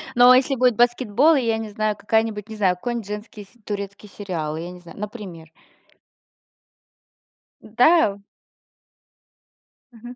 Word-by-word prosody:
Но 245 +1 +7
если 265 +2 +3
будет 250 -2 +2
баскетбол 245 +5 +3
и, 270 - +2
я 225 -2 0
не 220 -1 -6
знаю, 215 0 -1
какая-нибудь, 220 -1 -1
не 220 - -7
знаю, 190 -4 +1
какой-нить, 235 +2 -5
женский 210 0 -8
се 240 +5 -23
турецкий 200 0 -6
сериал, 165 -7 -5
я 175 +2 -6
не 180 - -12
знаю. 175 +3 -14
Например. 195 -7 -8 2.1
Да, 245 +2 +3
у 200 - -19 1.7
Мгм, 240 +2 -11
215 Hz, 135 wpm, -22 LUFS, 200-240 Hz, 2.1 s, Но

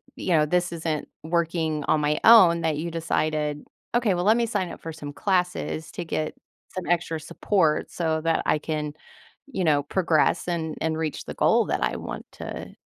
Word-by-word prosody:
you - - -5
know, 150 - +4
"this 180 +2 +1
isn't 160 -2 -3 0.2
working 160 -2 0
on 155 - +3
my 150 +1 +1
own," 185 -7 +8
that 160 -2 0
you 170 +2 -3
decided, 155 -2 -1 0.3
"Okay, 235 -5 +3
well, 175 - -1
let 215 +2 +6
me 235 - +2
sign 185 -6 -1
up - - -10
for 165 - -6
some 145 -2 -8
classes 180 -2 -1
to 175 - -4
get 155 -1 -2 0.4
some 185 -1 -4
extra 165 -2 0
support 160 0 0
so 160 -2 0
that 165 0 +1
I - - +3
can," 150 -1 -3 0.5
you 195 -10 -3
know, 145 -3 +3
"progress 160 0 +1
and 165 -3 -2
and 160 0 0
reach 160 -2 -3
the - - -7
goal - - +3
that - - -1
I - - 0
want - - -6
to - - -7
160 Hz, 190 wpm, -25 LUFS, 155-175 Hz, 0.5 s, own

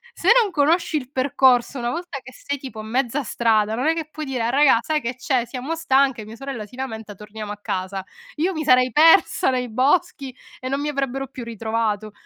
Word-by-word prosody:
se - - 0
non 420 -4 -1
conosci 320 +1 +2
il 255 -4 -6
percorso, 260 -1 +2
una 240 0 -2
volta 335 0 -5
che 255 0 -12
sei, 285 0 -5
tipo, 255 -5 -9
a - - -6
mezza 255 +5 -1
strada, 220 -2 +1
non 255 +6 -1
è 325 - +4
che 320 -2 -5
puoi 310 0 -6
dire: 255 -4 -3
"A 230 - 0
raga 275 -2 +5
sai 305 +4 -1
che 240 +1 -4
c'è? 255 -1 0
Siamo 255 +6 -5
stanche, 270 -7 +1
mia 220 +1 -10
sorella 265 -3 -6
si 210 - -16
lamenta, 225 -5 -6
torniamo 210 +1 -8
a - - -10
casa". 190 0 -3 0.3
Io 335 +5 0
mi 315 -2 -3
sarei 255 -2 +4
persa, 325 +2 +5
nei 250 -1 -2
boschi, 275 +1 0 0.2
e 255 - -6
non 275 +1 -1
mi 295 - -2
avrebbero 270 -1 -2
più 255 -2 -9
ritrovato. 220 -2 -2
255 Hz, 215 wpm, -22 LUFS, 225-285 Hz, 0.3 s, raga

